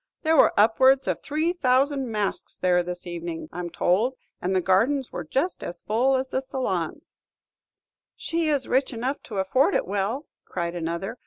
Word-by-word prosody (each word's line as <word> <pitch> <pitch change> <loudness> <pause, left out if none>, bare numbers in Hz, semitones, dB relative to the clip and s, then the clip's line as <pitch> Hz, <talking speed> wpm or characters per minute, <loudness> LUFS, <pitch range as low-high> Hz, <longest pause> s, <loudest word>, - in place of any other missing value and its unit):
"There 320 0 +3
were - - +6
upwards 260 +5 +5
of - - -1
three 315 +3 0
thousand 270 -3 +1
masks 210 -2 -2
there 180 -1 +3
this 175 +1 -6
evening, 170 -2 -5
I 175 - -7
'm 175 -1 -4
told, 205 +9 +1 0.3
and 185 +2 0
the - - +4
gardens 230 +10 +2
were 175 - -4
just 270 - -1
as 175 - -6
full 250 +5 +2
as 260 0 -1
the 260 - -1
salons." 250 - -3 1.0
"She 330 -1 -1
is 280 -4 +1
rich 260 +1 +1
enough 250 +5 -3
to 210 - -8
afford 195 +9 +2
it - - +1
well," 205 +9 -2 0.2
cried 170 -1 -4
another. 175 +7 -4
230 Hz, 175 wpm, -25 LUFS, 180-270 Hz, 1.0 s, were